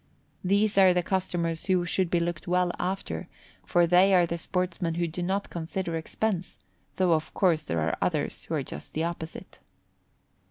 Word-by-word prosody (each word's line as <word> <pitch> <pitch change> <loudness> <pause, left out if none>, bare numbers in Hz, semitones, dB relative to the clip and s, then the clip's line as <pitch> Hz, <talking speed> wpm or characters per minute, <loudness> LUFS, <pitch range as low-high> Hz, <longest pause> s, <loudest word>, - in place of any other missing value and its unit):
These 200 +2 +3
are 185 -2 +6
the 180 - +2
customers 175 -3 -1
who 185 -2 +2
should 180 +1 0
be 175 - +2
looked 170 0 -3
well 180 0 +2
after, 190 +2 -3 0.4
for 175 -1 +3
they 180 +3 +5
are 175 -1 +5
the 170 0 -3
sportsmen 175 -1 -1
who 170 0 0
do 165 +2 -5
not 190 +3 -1
consider 170 +1 -3
expense, 180 +3 -2 0.4
though 185 -2 +2
of 155 -1 -1
course 170 -5 +3
there 85 -1 -1
are 80 +1 0
others - - -1
who - - -2
are - - -1
just 75 - -8
the 160 - 0
opposite. 165 -1 -6
175 Hz, 175 wpm, -27 LUFS, 165-185 Hz, 0.4 s, are